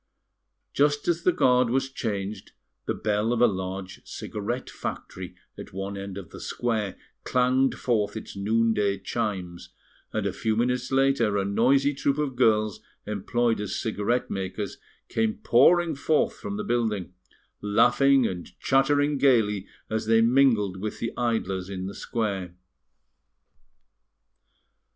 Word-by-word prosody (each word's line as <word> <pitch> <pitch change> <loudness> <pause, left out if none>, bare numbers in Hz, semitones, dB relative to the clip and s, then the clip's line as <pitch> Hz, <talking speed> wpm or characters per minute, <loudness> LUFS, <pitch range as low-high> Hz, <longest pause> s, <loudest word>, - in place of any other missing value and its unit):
Just 145 0 +2
as 170 -1 +1
the 180 - +4
guard 125 -6 +3
was 135 +2 +1
changed, 105 -5 -4 0.3
the - - 0
bell 105 +2 0
of 120 - 0
a 120 - +7
large 95 -2 -3
cigarette 110 +4 -5
factory 90 -1 -6 0.2
at - - -9
one 95 +1 -4
end 100 -1 -6
of 95 -4 -9
the - - -9
square 110 -5 -2 0.3
clanged 130 +1 +2
forth 110 -4 0
its 110 - -8
noon 110 +3 +2
day 100 -2 +1
chimes, 95 -4 -4 0.4
and 110 -2 -2
a 100 - -1
few 110 +2 -1
minutes 125 +2 0
later 135 -6 +2
a 100 - 0
noisy 135 +8 +3
troop 140 +1 0
of 145 -4 -1
girls 110 -4 +2 0.3
employed 115 +2 0
as 105 - -3
cigarette 115 +2 -1
makers 95 +1 -4 0.3
came 110 -1 0
pouring 165 +7 +4
forth 150 +2 +1
from 200 - -5
the 210 - -3
building, 110 - -1 0.5
laughing 125 +6 +4
and 90 -5 -5
chattering 145 +1 +2
gaily 105 -8 +3 0.2
as 110 0 -2
they 115 0 +5
mingled 115 -5 +3
with 105 0 -4
the 115 - -3
idlers 100 -6 -1
in 95 -1 -4
the 100 - -5
square. 100 -7 -3
110 Hz, 140 wpm, -26 LUFS, 100-130 Hz, 0.5 s, a